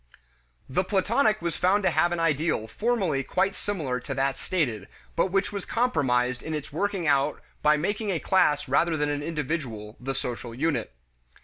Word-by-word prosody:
The 180 +8 +1
Platonic 215 +2 +2
was 170 -2 -1
found 195 +3 +2
to 185 - +3
have 175 +2 +3
an 175 - -1
ideal 155 -6 +1
formally 195 - 0
quite 190 +8 0
similar 150 -12 -2
to 135 +2 -5
that 135 0 0
stated, 120 - -1 0.3
but 170 - +3
which 195 +1 0
was 200 -2 -3
compromised 130 - +1
in 160 - -4
its 150 -2 -6
working 195 +1 -1
out 140 0 +2 0.2
by 150 0 +5
making 205 +7 -1
a 185 - +1
class 150 -6 +2
rather 160 +5 +2
than 150 0 0
an 145 0 -1
individual 140 -9 -4
the 135 +2 -3
social 120 -2 -4
unit. 155 - 0
155 Hz, 175 wpm, -26 LUFS, 135-190 Hz, 0.3 s, by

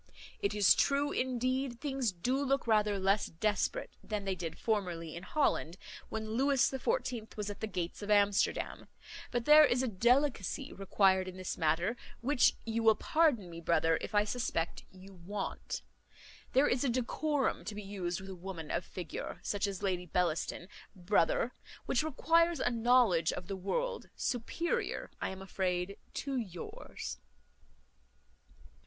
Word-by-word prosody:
It 200 +1 -1
is 205 -2 +6
true, 285 +1 +2
indeed, 255 0 -1
things 270 -5 -1
do 250 +10 -1
look 275 0 +1
rather 210 -3 +3
less 195 +2 +2
desperate 210 - -1
than 210 -2 -3
they 195 - 0
did 170 -3 -5
formerly 175 -7 -2
in 170 - -6
Holland, 195 - 0 0.3
when 220 0 -4
Lewis 270 +3 +3
the 265 - -3
Fourteenth 245 - -2
was 210 -1 -2
at 205 - -9
the 220 - -2
gates 180 -2 -4
of 205 - -6
Amsterdam; 205 -1 +2 0.4
but 240 -2 -2
there 305 +1 +9
is 250 -2 +3
a - - +1
delicacy 250 +4 +1
required 190 -1 +2
in 185 0 -7
this 185 -1 -3
matter, 165 +8 +1 0.2
which 260 +1 +3
you 230 0 -1
will 220 -1 +6
pardon 295 - +2
me, 170 -1 -8
brother, 165 -1 +2
if - - -5
I 205 - +5
suspect 210 -7 -2
you 190 +1 -13
want. 190 +3 -5 0.7
There 270 +3 +5
is 245 +1 +1
a 275 - +2
decorum 265 +4 0
to 215 - -5
be 210 - -6
used 190 -3 -3
with 190 - -9
a - - -6
woman 175 -3 -7
of - - -1
figure, 175 -4 -6
such 205 0 0
as 200 0 -5
Lady 180 -2 -1
Bellaston, 175 +1 -1 0.3
brother, 210 - +1 0.3
which - - +2
requires 330 +2 +2
a 245 - +1
knowledge 230 -8 +4
of 180 - -6
the 195 - -4
world, 470 - -2
superior, 340 - -2
I - - -1
am 190 0 -7
afraid, 185 0 -2 0.2
to 275 -2 -2
yours." 185 -8 -6
210 Hz, 160 wpm, -33 LUFS, 185-255 Hz, 0.7 s, there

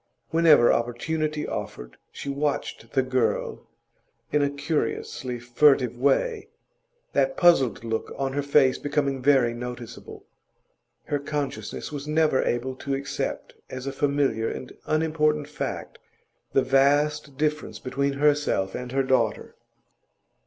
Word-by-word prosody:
Whenever 160 -7 +6
opportunity 150 +6 -1
offered, - - -6 0.2
she - - -8
watched 140 -4 -3
the 130 - +3
girl 130 -1 -1 0.6
in 150 - +2
a 140 - +2
curiously 140 -3 -3
furtive 125 0 +3
way, 405 - +1 0.7
that 135 -1 +1
puzzled 135 - +4
look 115 -1 -3
on 135 -1 -2
her 145 - 0
face 140 -2 +3
becoming 140 -2 -1
very 130 -3 +4
noticeable. 120 -1 -8 0.8
Her 145 - -2
consciousness 140 -5 -4
was 145 0 -6
never 155 -3 +2
able 125 +2 -1
to 140 0 -2
accept 140 +1 -4 0.2
as 130 0 -6
a 135 - -3
familiar 140 -6 +1
and 130 - -7
unimportant 155 -1 +1
fact 150 -1 -5 0.5
the 135 - +3
vast 145 +1 +2
difference 150 +1 -1
between 140 +2 -1
herself 145 -9 +1
and 125 0 -5
her 135 0 +2
daughter. 125 -4 0
140 Hz, 125 wpm, -25 LUFS, 125-150 Hz, 0.8 s, Whenever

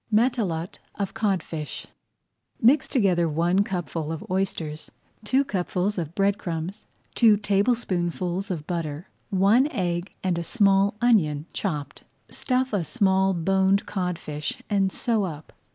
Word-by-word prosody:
MATELOTE 215 -7 0 0.2
OF 200 -2 -3
CODFISH 190 -8 -2 0.7
Mix 260 +5 +4
together 180 - +2
one 175 +5 +2
cupful 165 -5 -3
of 160 - -5
oysters, 170 -5 -2 0.3
two 260 +6 +2
cupfuls 190 -1 -1
of 165 -1 -5
bread 200 0 +2
crumbs, 170 +4 -5 0.3
two 220 -3 +5
tablespoonfuls 195 -3 0
of 165 -5 -4
butter, 165 -2 -4 0.2
one 205 +7 +4
egg, 180 - -2
and 180 -3 0
a - - -3
small 200 +1 +3
onion, 160 -12 +3
chopped. 150 -7 -4 0.3
Stuff 255 -1 -1
a 195 -4 +1
small 190 0 +2
boned 190 +3 +2
codfish 160 -6 -4
and 195 -2 +2
sew 225 -1 0
up. 155 -4 -6
190 Hz, 125 wpm, -25 LUFS, 170-205 Hz, 0.7 s, two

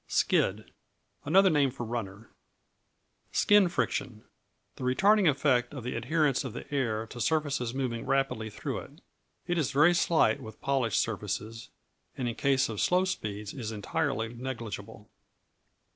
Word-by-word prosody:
Skid 105 +3 +1 0.5
Another 190 +5 +5
name 145 -3 +3
for 125 -2 -6
runner. 110 -2 -6 1.0
Skin 205 -3 +4
Friction 130 -9 -2 0.5
The - - -7
retarding 195 +9 +4
effect 135 -2 +1
of 130 - -6
the 125 - -3
adherence 140 +4 +1
of 130 -5 -6
the - - -7
air 115 -5 0
to 120 +2 -8
surfaces 140 -4 0
moving 125 -4 -3
rapidly 135 -5 0
through - - -4
it. - - -13 0.4
It 175 -1 0
is 145 - 0
very 150 +5 +5
slight 165 -9 +2
with 110 - -10
polished 135 -5 +1
surfaces, 110 +1 -3 0.5
and 125 - -2
in 120 - -1
case 135 +2 +2
of 110 -3 -4
slow 180 +1 +3
speeds 105 - -4
is 115 -6 -5
entirely 115 +1 -2
negligible. 115 -4 -7
125 Hz, 145 wpm, -29 LUFS, 110-145 Hz, 1.0 s, Another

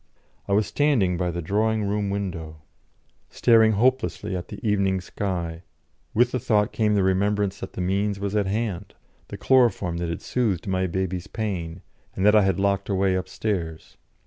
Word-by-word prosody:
I 100 - 0
was 105 +1 +3
standing 125 -12 +2
by 90 0 -1
the 85 0 -4
drawing 110 +4 +1
room 100 0 -1
window, 85 -6 -5 0.7
staring 110 -2 +4
hopelessly 115 -3 0
at 90 -1 -5
the - - -8
evening 100 -2 +1
sky; 90 -3 -4 0.5
with 120 +2 +4
the 130 - -1
thought 105 0 +1
came 105 -2 +1
the 100 - +2
remembrance 100 +1 +1
that - - -7
the - - -4
means 100 +2 0
was 100 +1 -3
at 100 -2 +1
hand 100 -2 -3 0.3
the - - -7
chloroform 115 -10 +2
that 85 -1 -3
had 85 - -5
soothed 105 -9 -1
my 95 -1 0
baby's 90 0 -3
pain, 90 -6 -4 0.3
and 95 - 0
that 105 +1 +6
I 105 - +7
had 95 -2 +1
locked 100 0 0
away 95 -1 +2
upstairs. 95 -3 -3
100 Hz, 170 wpm, -24 LUFS, 90-105 Hz, 0.7 s, I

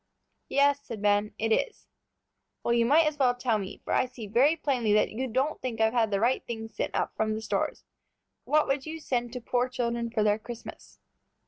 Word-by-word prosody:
"Yes," 285 0 +3
said 230 -6 -7
Ben, 205 0 +1
"it 225 - -1
is." 465 - 0 0.8
"Well, 235 - +1
you 235 -1 +3
might 310 +5 +5
as 305 -1 -1
well 250 -2 +3
tell 240 -3 0
me, 195 0 -7
for - - -2
I - - +2
see 245 -3 -9
very 255 +10 +3
plainly 250 -9 0
that 210 - +3
you 255 +4 -3
don't 260 +6 -1
think 240 -4 -4
I've 220 +1 +3
had 230 -3 +2
the 200 -1 0
right 240 +4 +2
things 225 -1 -6
sent - - -3
up - - -1
from 215 0 0
the 220 - -4
stores. - - -2 0.6
What 305 0 +3
would 275 +1 -1
you 320 +1 -5
send 245 -5 -2
to 250 - -5
poor 245 +2 0
children 235 -2 -2
for 225 -2 0
their 210 0 +2
Christmas?" 235 +1 -10
240 Hz, 215 wpm, -28 LUFS, 220-265 Hz, 0.8 s, might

